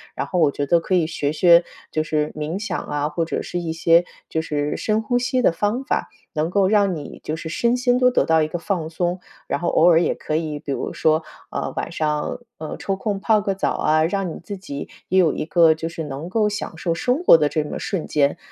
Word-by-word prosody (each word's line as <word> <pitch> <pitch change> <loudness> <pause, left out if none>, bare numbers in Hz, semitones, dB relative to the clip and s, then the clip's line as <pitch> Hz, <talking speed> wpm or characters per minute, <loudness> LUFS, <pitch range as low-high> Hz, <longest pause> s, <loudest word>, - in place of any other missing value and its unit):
然 - - -3
后 180 - -1
我 155 -4 +4
觉 145 - -2
得 170 +4 +4
可 185 +3 -1
以 175 -3 +3
学 145 -3 -2
学， 170 +1 +6 0.3
就 155 - 0
是 155 -1 -1
冥 155 +4 -3
想 210 - -3
啊， 145 0 -2
或 160 +2 -1
者 - - -3
是 175 - -4
一 170 -2 -3
些 165 +1 +4 0.2
就 160 - -1
是 150 -2 -2
深 215 0 0
呼 245 +3 0
吸 255 +1 0
的 - - +4
方 210 +9 -1
法。 280 - -1 0.2
能 155 0 0
够 190 +1 +2
让 200 -3 +3
你 150 -2 -8
就 155 - -2
是 160 0 -6
身 235 +8 +1
心 250 0 +2
都 250 0 +5
得 250 - +2
到 160 0 +3
一 155 - +1
个 165 - -4
放 170 -2 -2
松， 175 +2 -2 0.3
然 - - -1
后 175 - -2
偶 165 - +4
尔 165 -1 +6
也 - - +1
可 155 - -2
以 155 -2 -3
比 145 - -6
如 - - -3
说， 160 0 +2 0.3
啊， - - -3
晚 - - -3
上 150 -1 -1 0.2
呃， 155 - -6
抽 195 - -2
空 200 0 -3
泡 215 +1 +3
个 200 -1 -1
澡 195 - -1
啊， 155 +1 +2
让 185 -1 -2
你 - - -9
自 200 +4 -6
己 145 -7 -7 0.2
也 190 - +4
有 170 -4 +4
一 - - -3
个 165 0 +5
就 160 +1 -5
是 165 -1 -5
能 145 +4 -6
够 215 +2 +2
享 205 -5 -4
受 165 +1 -1
生 250 - 0
活 355 - +8
的 150 -2 +1
这 155 0 0
么 150 - -5
瞬 190 -6 -3
间。 145 -2 +1
165 Hz, 270 characters per minute, -22 LUFS, 155-195 Hz, 0.3 s, 活